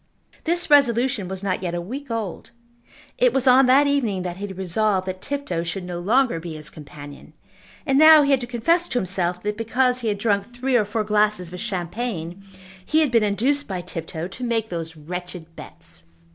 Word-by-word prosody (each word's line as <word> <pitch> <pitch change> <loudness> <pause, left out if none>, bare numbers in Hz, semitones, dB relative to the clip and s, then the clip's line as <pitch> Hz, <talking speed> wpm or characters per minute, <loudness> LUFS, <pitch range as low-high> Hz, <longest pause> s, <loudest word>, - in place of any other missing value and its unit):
This 340 -1 0
resolution 250 -6 +3
was 190 +1 -6
not 185 -2 -1
yet 175 -2 -3
a - - -2
week 260 +11 -7
old. 220 -6 -4 0.7
It - - +4
was 270 0 +1
on 255 +1 +6
that 270 +3 +5
evening 240 -10 0
that 180 -1 -5
he 205 +1 -5
had 190 -2 -9
resolved 190 +1 0
that 185 0 -5
Tifto 280 -13 -3
should 170 +3 -4
no 175 -1 -5
longer 230 +1 +2
be 165 -1 -7
his 155 -1 -6
companion; 145 -1 -12 0.5
and 270 -2 +3
now 310 -1 +9
he 280 - +1
had 270 -2 +3
to 240 - -5
confess 330 +9 +1
to - - -2
himself 180 -3 -1
that 210 0 -2
because 250 +2 +1
he 235 - -3
had 205 -1 0
drunk 200 -1 0
three 255 +2 -1
or 220 -4 +3
four 215 +2 -2
glasses 210 -4 +1
of 180 - -6
champagne 185 -2 -4 0.4
he 315 +8 +2
had 300 -5 +1
been 230 -2 +4
induced 240 +8 0
by 185 -3 -4
Tifto 165 -1 -5
to 195 +7 -8
make 225 -2 -1
those 165 -2 -5
wretched 175 +1 -8
bets. 80 - -8
210 Hz, 200 wpm, -23 LUFS, 180-255 Hz, 0.7 s, now